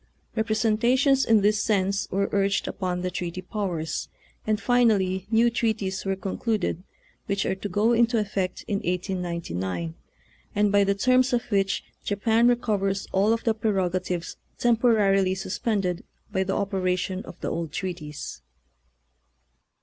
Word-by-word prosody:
Eepresentations 235 +5 +2
in 225 -2 +5
this 210 +1 +3
sense 195 -2 +1
were 200 +1 0
urged 200 0 +1
upon 180 -2 -2
the 180 - -1
treaty 180 +1 -4
powers, 180 -6 -3 0.4
and 215 -1 +1
finally 205 -7 +2
new 230 +1 +4
treaties 220 -5 -1
were 195 0 0
concluded, 195 -1 -2 0.5
which 200 -1 0
are - - +1
to 190 +2 -5
go 210 +5 +2
into 235 0 +3
effect 195 -3 -2
in 205 - 0
1899, 170 - -3 0.6
and 205 0 +3
by 200 0 +5
the 200 0 +1
terms 255 +4 +3
of 240 - +2
which 195 -1 +1 0.2
Japan 225 +3 +2
recovers 205 -5 +1
all 200 +3 +3
of 230 0 0
the 225 - +2
prerogatives 185 -5 -1 0.2
temporarily 210 -5 +3
suspended 190 -1 -2 0.3
by 190 - +1
the 190 0 -2
operation 190 -1 -1
of - - -11
the - - -2
old 165 -2 -3
treaties. 155 - -5
200 Hz, 135 wpm, -25 LUFS, 185-220 Hz, 0.6 s, in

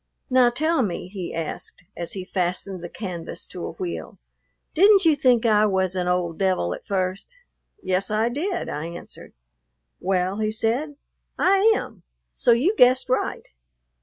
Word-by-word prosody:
"Now, 255 -1 +5
tell 315 +5 +1
me," 185 -4 -3
he 185 -3 -6
asked, 165 +2 -4
as 170 -1 -2
he 190 -2 -5
fastened 185 0 -2
the 175 - -6
canvas 180 -5 -6
to - - -8
a - - -5
wheel, 365 -4 -6 0.6
"didn't 395 +2 +6
you 320 -2 +5
think 250 -4 +3
I 215 -1 +4
was 190 -2 +1
an 180 -1 -2
old 180 -2 -1
devil 185 - +1
at - - -10
first?" 190 - -2 0.5
"Yes, 185 +1 0
I 215 +2 +1
did," 345 +10 -2
I 150 +3 -4
answered. 170 0 -10 0.7
"Well," 190 +1 0
he 215 0 0
said, 235 +7 -1 0.4
"I 390 +3 +4
am; - - -6 0.3
so - - +2
you 285 - +3
guessed 255 -5 +4
right." 255 - -1
210 Hz, 160 wpm, -24 LUFS, 180-260 Hz, 0.7 s, didn't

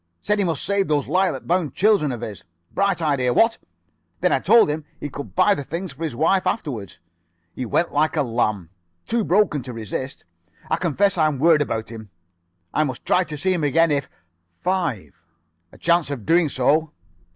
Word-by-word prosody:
Said 210 0 0
he - - +3
must 165 -4 -1
save 200 -1 +1
those 145 -3 0
lilac 185 +5 0
bound 175 -3 0
children 195 -8 +3
of 120 -2 -5
his. 105 -4 -7 0.3
Bright 195 -3 0
idea, 135 -5 +1
what? 225 0 +3 0.6
Then - - +3
I - - +3
told 225 - +5
him 150 +1 -3 0.2
he 145 - -5
could 140 +1 -8
buy 195 +3 +4
the 145 - -4
things 170 +3 -5
for 150 +5 -8
his 155 -7 -3
wife 185 +7 +2
afterwards. 120 - -4 0.5
He 125 - -5
went 170 +8 0
like 155 +2 +1
a 150 - +2
lamb, 110 -8 -1 0.3
too 235 -1 0
broken 185 -7 +2
to 125 0 -8
resist. 115 +4 -6 0.5
I - - +3
confess 185 +3 +1
I 155 - +4
am 150 -3 -2
worried 155 +2 +4
about 110 -6 -2
him. 110 -2 -10 0.6
I 155 - +2
must 130 -5 -5
try 185 - +3
to 155 -1 -6
see 185 +6 +1
him 170 -4 -2
again 165 +3 +3
if 140 -1 -1 0.5
5 170 - -2 0.5
a - - -16
chance 170 -2 +2
of 130 -8 -5
doing 165 -2 +3
so." 150 +4 +1
155 Hz, 195 wpm, -22 LUFS, 130-185 Hz, 0.6 s, told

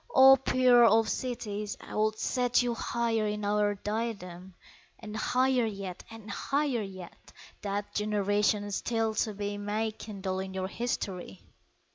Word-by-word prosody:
O 265 0 +9
Pearl 245 -3 +5
of 225 - -1
Cities! 215 -5 -3
I - - -11
would 215 0 +1
set 245 0 +1
You 240 -1 0
higher 230 -1 -1
in 210 0 -3
our 205 0 +2
diadem, 195 -4 -5 0.4
And 215 -1 -8
higher 250 +2 +2
yet 195 -4 -6
and 225 -2 -9
higher 275 +2 0
yet, 190 -3 -10 0.3
That 205 0 -3
generations 205 -1 +1
still 225 -2 -1
to 215 -1 -1
be 205 0 -3
May 215 +2 -1
kindle 195 -3 -5
at 190 0 -7
your 190 0 -2
history! 185 - -4
210 Hz, 140 wpm, -29 LUFS, 200-230 Hz, 0.4 s, O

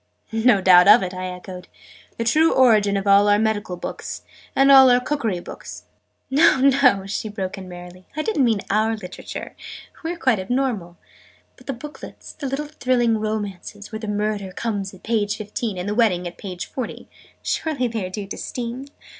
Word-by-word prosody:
"No 225 -2 +3
doubt 180 -1 +7
of 210 +1 +8
it," 185 0 -4
I 185 0 -4
echoed. 180 0 -8 0.5
"The 230 - -1
true 310 +8 +3
origin 215 -6 +4
of 195 - -3
all 200 +1 +5
our 205 0 +5
medical 210 -4 -1
books - - -6 0.3
and 275 +1 +5
all 265 -1 +9
our 245 0 +5
cookery 250 -8 -2
books - - -10 0.2
" - - -46
"No, 285 +1 +5
no!" 260 -7 +4
she 205 +2 -4
broke 195 -3 -4
in 185 -1 -9
merrily. 180 +1 -11
"I 310 - 0
didn't 310 -9 +1
mean 225 -5 +2
our 220 +2 +1
Literature! 185 -3 -8 0.5
We 325 - -2
are - - -9
quite 255 - +2
abnormal. 200 -5 -2 0.6
But - - -20
the 275 - -2
booklets 290 +5 -10
the 285 - -5
little 275 +3 -3
thrilling 245 -6 +1
romances, 210 -1 -5
where 220 - -5
the 220 - -6
Murder 210 -2 -2
comes 200 -3 -3
at 190 - -16
page 215 -3 0
fifteen, 215 -1 -4
and 180 +2 -4
the 205 - -1
Wedding 200 -6 +2
at 175 - -10
page 180 -3 -6
forty 255 -3 -6 0.4
surely 280 -6 -1
they 225 -3 -3
are 185 - -4
due 200 +2 -5
to 195 - -7
Steam?" 245 +2 -5
215 Hz, 190 wpm, -22 LUFS, 195-250 Hz, 0.6 s, all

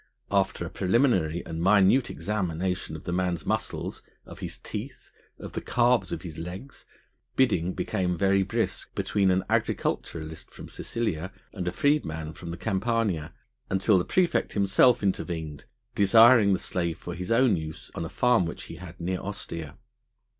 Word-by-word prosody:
After 95 -3 +1
a 85 - -7
preliminary 95 - +2
and 80 0 -5
minute 100 +6 +4
examination 90 -4 -2
of 80 - -9
the 90 - -4
man's 90 -2 -1
muscles, - - -2 0.2
of - - -11
his - - -5
teeth, - - -8 0.3
of - - -8
the - - -4
calves 120 -6 +2
of - - -4
his 80 -3 -7
legs, 90 +11 -8 0.5
bidding 95 -9 +2
became 90 -1 -1
very 95 +1 +3
brisk 95 - -2
between 100 -2 +1
an 95 0 +2
agriculturist 80 0 -2
from - - -10
Sicilia 95 -6 -3 0.2
and 90 -4 -4
a - - +1
freedman 80 - 0
from 85 0 -9
the 85 - -5
Campania, 100 -6 -1 0.4
until 95 +1 +3
the - - 0
praefect 180 - +1
himself 100 +4 +4
intervened, 80 -6 -2 0.3
desiring 110 0 +6
the - - +2
slave 85 -3 -2
for 85 - -7
his 90 +3 -5
own 115 -2 +4
use 80 -1 -7
on - - -4
a 80 - -5
farm 120 -8 +3
which 85 - -6
he - - -9
had 90 -1 -11
near 90 +2 -2
Ostia. 85 -6 -6
95 Hz, 160 wpm, -27 LUFS, 85-105 Hz, 0.5 s, desiring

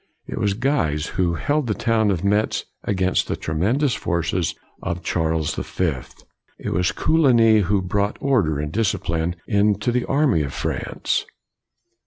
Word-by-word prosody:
It - - -5
was 100 -1 +1
Guise 105 - 0
who 85 -2 0
held 145 - 0
the 105 - 0
town 110 -2 +1
of 90 -3 -1
Metz 105 +2 +1 0.2
against 95 -1 +1
the - - -1
tremendous 115 - 0
forces 85 0 -1 0.3
of 85 +1 -4
Charles 80 -2 0
the - - -3
Fifth. 80 -9 -3 0.3
It - - -5
was 90 0 +1
Co - - -1
ligny 120 -8 +5
who 100 0 +1
brought 100 +3 -1
order 105 - +1
and 75 +1 -3
discipline 85 -5 -1
into 105 +3 +2
the 125 0 0
army 135 - +2
of 70 -2 -4
France. - - -2
100 Hz, 155 wpm, -22 LUFS, 85-115 Hz, 0.3 s, ligny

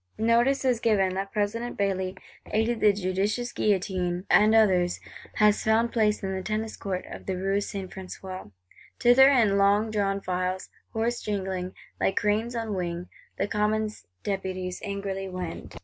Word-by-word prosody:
—Notice 235 +5 +3
is 250 -3 +2
given 200 -5 +2
that 195 +1 -3
President 225 +3 -2
Bailly, 190 -2 -1 0.3
aided 225 +2 0
by 210 - +6
judicious 200 +5 -1
Guillotin 185 -3 0
and 215 +1 +6
others, 185 -5 +3 0.4
has 210 -1 +4
found 225 +2 +2
place 215 -2 +1
in 190 0 -2
the 190 - -3
Tennis 215 +3 -3
Court 185 -2 -4
of - - -10
the 190 -1 -1
Rue 195 +2 0
St. 195 -2 -5
François. 185 - -8 0.5
Thither, 255 +3 +7
in 220 -7 +4
long 205 +2 +3
drawn 200 -2 0
files, 185 0 -2 0.2
hoarse 235 +2 -1
jingling, 190 -3 -3 0.2
like 195 - +1
cranes 215 +4 +1
on 225 -2 -2
wing, 175 -1 -3 0.3
the 195 - 0
Commons 215 0 -1 0.2
Deputies 185 -2 -3
angrily 200 -1 -4
wend. 180 -2 -6
200 Hz, 150 wpm, -27 LUFS, 190-220 Hz, 0.5 s, Thither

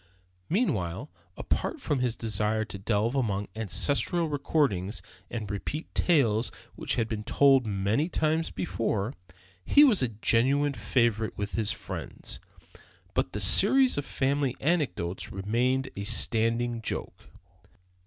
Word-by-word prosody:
Meanwhile, 115 - -1 0.3
apart 325 - -2
from 145 - -1
his 125 -2 0
desire 110 0 0
to 100 - -8
delve 105 +3 0
among 105 -7 -1
ancestral 125 - 0
records 135 - 0 0.3
and 110 -4 -4
repeat 145 +10 -5
tales 120 -10 +2 0.2
which - - -2
had 115 -2 0
been 110 -1 -4
told 135 0 +4
many 105 - 0
times 160 0 0
before, 115 - -2 0.5
he 290 - +6
was 240 - +5
a 130 - +2
genuine 130 +6 +2
favorite 115 -4 0
with 105 0 -3
his 110 -3 -1
friends. - - -6 0.7
But 90 - 0
that 105 - -3
series 250 - +5
of 145 - -1
family 135 -1 -1
anecdotes 140 - -1
remained 120 +7 0
a 100 - -4
standing 115 +2 +1
joke. - - -5
115 Hz, 125 wpm, -28 LUFS, 105-145 Hz, 0.7 s, he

